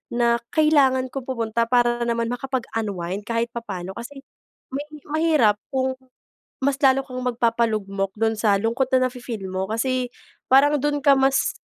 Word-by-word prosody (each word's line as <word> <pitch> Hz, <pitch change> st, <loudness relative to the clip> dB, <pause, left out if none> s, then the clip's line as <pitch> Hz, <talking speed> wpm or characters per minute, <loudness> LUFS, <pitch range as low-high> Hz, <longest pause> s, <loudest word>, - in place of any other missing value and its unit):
na 235 Hz, 0 st, +2 dB, 0.2 s
kailangan 270 Hz, -5 st, +3 dB
ko 270 Hz, -, -4 dB
pumunta 230 Hz, -2 st, -1 dB
para 240 Hz, -1 st, +2 dB
naman 235 Hz, 0 st, -1 dB
makapag-unwind 215 Hz, -7 st, -3 dB
kahit 230 Hz, 0 st, -1 dB
papaano 195 Hz, -6 st, -6 dB
kasi 270 Hz, +4 st, -9 dB, 0.5 s
mahi 295 Hz, +1 st, -7 dB
mahirap 305 Hz, -10 st, +3 dB
kung 260 Hz, 0 st, 0 dB, 0.7 s
mas 280 Hz, -1 st, +2 dB
lalo 265 Hz, 0 st, +5 dB
kang 255 Hz, -2 st, -7 dB
magpapalugmok 220 Hz, -5 st, 0 dB
don 225 Hz, 0 st, +1 dB
sa 210 Hz, -2 st, +3 dB
lungkot 235 Hz, +4 st, 0 dB
na 255 Hz, 0 st, +4 dB
nafe-feel 240 Hz, -6 st, -7 dB
mo 185 Hz, 0 st, -2 dB
kasi 250 Hz, +1 st, -1 dB, 0.4 s
parang 290 Hz, +2 st, +6 dB
don 290 Hz, 0 st, 0 dB
ka 280 Hz, -1 st, +5 dB
mas 270 Hz, 0 st, +2 dB
245 Hz, 145 wpm, -23 LUFS, 225-270 Hz, 0.7 s, parang